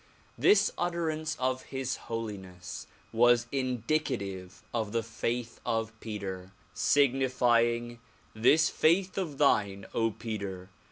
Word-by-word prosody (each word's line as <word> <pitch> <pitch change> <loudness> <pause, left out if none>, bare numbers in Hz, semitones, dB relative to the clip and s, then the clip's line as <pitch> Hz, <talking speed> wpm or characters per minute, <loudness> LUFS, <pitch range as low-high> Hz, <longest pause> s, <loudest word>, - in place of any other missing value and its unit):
This 205 0 +4
utterance 160 -3 -1
of 130 0 0
His 130 -1 -3
Holiness 95 -6 -6 0.3
was 120 +1 +5
indicative 125 -7 -2
of 110 -3 -2
the 115 -1 +1
faith 115 +1 -3
of 115 -1 -1
Peter, 95 -4 -6 0.2
signifying 120 -3 +2 0.2
— - - -32
This 135 +8 +4
faith 180 +4 +2
of 155 -7 -4
thine, 100 -9 +2 0.3
Peter! 100 -4 -5
120 Hz, 105 wpm, -30 LUFS, 105-135 Hz, 0.3 s, was